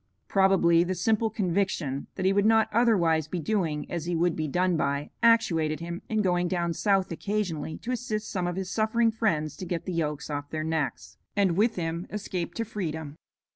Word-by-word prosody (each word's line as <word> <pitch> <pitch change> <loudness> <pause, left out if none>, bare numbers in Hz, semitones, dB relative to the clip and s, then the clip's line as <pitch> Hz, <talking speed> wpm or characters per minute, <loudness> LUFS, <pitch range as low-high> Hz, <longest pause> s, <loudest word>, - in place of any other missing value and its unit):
Probably 190 -4 +4
the 185 +1 -2
simple 220 +5 +1
conviction 180 -9 -1
that 185 - -3
he 190 - +4
would 200 +1 +3
not 220 0 +4
otherwise 175 -10 +3
be 175 +2 -3
doing 165 -4 -1
as 170 -2 -4
he 175 0 -1
would 170 0 +2
be 155 -1 -2
done 180 +4 +1
by 140 -1 -1
actuated 165 -10 +3
him 170 +1 -5
in 215 -1 +1
going 175 -1 +1
down 170 -2 -1
South 195 +1 +1
occasionally 170 -4 -2
to 245 - -5
assist 220 -4 -3
some 180 -3 -1
of 175 - -2
his 190 0 -4
suffering 225 +1 +2
friends 160 -10 0
to 185 - -6
get 170 -1 -3
the 185 - -3
yokes 150 -3 -2
off 145 0 -4
their 155 -1 -3
necks, 160 -3 -3 0.2
and 195 -4 +2
with 220 +4 +2
him 170 +1 -3
escape 190 -4 -4
to 230 - -2
freedom. 160 -8 -4
180 Hz, 195 wpm, -27 LUFS, 160-210 Hz, 0.2 s, Probably